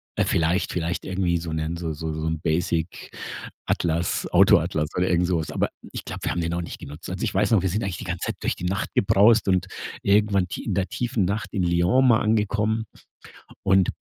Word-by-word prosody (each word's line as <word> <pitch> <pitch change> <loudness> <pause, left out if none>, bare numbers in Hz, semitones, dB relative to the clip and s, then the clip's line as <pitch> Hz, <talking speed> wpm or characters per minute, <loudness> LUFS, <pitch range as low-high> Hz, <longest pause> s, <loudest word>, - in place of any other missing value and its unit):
äh, - - +2
vielleicht 85 +3 +1
vielleicht 85 0 -2
irgendwie 90 -2 0
so 85 0 -5
'nen 80 +2 -2
so 85 -1 -3
so 80 +1 -4
so 80 +1 -3
'n 80 0 -1
basic 85 +1 -1 0.5
Atlas, 85 +1 0
Auto-Atlas 75 -1 +4
oder 90 +1 +2
irgend 90 0 +2
sowas. 85 -3 -1
Aber - - 0 0.2
ich - - -6
glaub, - - -6
wir - - 0
haben 85 - -2
den 85 0 -1
auch 85 - -1
nicht 85 - -7
genutzt. 75 +4 -9
Also 95 +1 -4
ich 105 - -1
weiß 100 +3 +2
noch, 110 -5 +5
wir - - +2
sind 105 +6 -1
eigentlich 95 -3 -3
die - - -7
ganze 90 -1 -3
Zeit - - -2
durch - - 0
die - - -10
Nacht 100 +4 -1
gebraust 105 +3 +5
und 95 0 +2 0.4
irgendwann 100 -2 +3
tie - - -6
in - - -1
der 95 -1 0
tiefen 120 -5 -1
Nacht 100 +1 -2
in 95 -4 0
Lyon 90 +10 +3
mal 120 -2 +5
angekommen 110 +1 +1 0.8
und 95 -2 +4
90 Hz, 220 wpm, -24 LUFS, 85-100 Hz, 0.8 s, noch